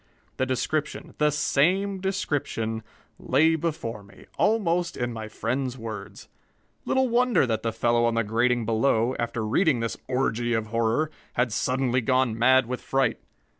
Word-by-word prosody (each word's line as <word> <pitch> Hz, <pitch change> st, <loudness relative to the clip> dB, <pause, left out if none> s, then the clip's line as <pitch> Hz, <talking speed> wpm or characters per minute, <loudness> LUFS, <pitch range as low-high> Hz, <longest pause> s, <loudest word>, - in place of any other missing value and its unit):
The 130 Hz, -, 0 dB
description 150 Hz, +4 st, -2 dB
the 150 Hz, 0 st, +4 dB
same 185 Hz, +7 st, +1 dB
description 145 Hz, -, -2 dB, 0.4 s
lay 160 Hz, +5 st, +3 dB
before 155 Hz, -9 st, -3 dB
me, 100 Hz, 0 st, -17 dB
almost 180 Hz, -5 st, +1 dB
in 120 Hz, -1 st, -2 dB
my 110 Hz, -1 st, -6 dB
friend's 125 Hz, +4 st, -3 dB
words. 105 Hz, -3 st, -8 dB, 0.6 s
Little 265 Hz, 0 st, +2 dB
wonder 240 Hz, -, +3 dB
that 110 Hz, -3 st, -1 dB
the 115 Hz, -, -1 dB
fellow 120 Hz, +1 st, +2 dB
on 115 Hz, -1 st, +1 dB
the 115 Hz, -, +2 dB
grating 120 Hz, +2 st, +1 dB
below, 115 Hz, +2 st, +1 dB
after 120 Hz, -1 st, -2 dB
reading 135 Hz, -, +2 dB
this 115 Hz, 0 st, -3 dB
orgy 120 Hz, -2 st, 0 dB
of 110 Hz, -1 st, 0 dB
horror, 115 Hz, +7 st, 0 dB, 0.2 s
had 125 Hz, -1 st, +1 dB
suddenly 130 Hz, 0 st, +1 dB
gone 130 Hz, -2 st, +1 dB
mad 130 Hz, +3 st, +4 dB
with 125 Hz, +2 st, -4 dB
fright. 135 Hz, -3 st, 0 dB
125 Hz, 150 wpm, -26 LUFS, 115-150 Hz, 0.6 s, the